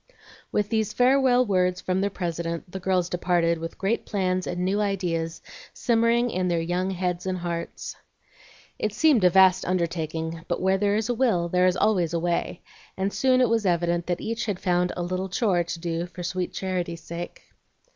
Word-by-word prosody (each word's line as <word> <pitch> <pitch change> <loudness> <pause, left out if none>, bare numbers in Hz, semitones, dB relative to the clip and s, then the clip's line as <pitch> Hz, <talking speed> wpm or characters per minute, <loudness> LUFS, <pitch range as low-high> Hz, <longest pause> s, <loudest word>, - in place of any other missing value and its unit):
With 210 -1 0
these 220 -1 0
farewell 255 0 +4
words 180 -3 +1
from 185 +1 -1
their 200 - +1
president 170 -2 -4
the 190 - -5
girls 185 -1 +1
departed, 175 -2 +1
with 165 +1 -6
great 200 +4 0
plans 185 -3 -1
and 180 0 -2
new 200 +3 +1
ideas 175 -5 -2 0.3
simmering 235 +1 +2
in 185 0 -1
their 170 -1 +1
young 175 +3 -1
heads 180 -1 -2
and 185 -1 -1
hearts. 170 -1 -5 0.8
It 210 -1 -2
seemed 295 -10 +4
a 180 - +7
vast 190 0 +5
undertaking; 165 -2 -2
but - - -1
where 190 +1 +2
there 205 0 +2
is 215 0 0
a - - +2
will 220 -9 +1
there 180 +1 +3
is 185 0 +1
always 180 -6 +2
a - - +1
way, 170 +1 -2 0.3
and 195 +1 -1
soon 255 -1 +3
it 250 - +3
was 225 -3 +1
evident 175 -1 +1
that 175 -1 -1
each 230 +1 -3
had 200 -4 -2
found 180 -1 +1
"a 175 - -1
little 185 +2 -3
chore" 185 -3 +1
to 170 0 -5
do 170 0 -2
for 180 0 -8
sweet 180 +1 -2
charity's 175 -3 -3
sake. 170 +1 -7
185 Hz, 190 wpm, -25 LUFS, 175-205 Hz, 0.8 s, a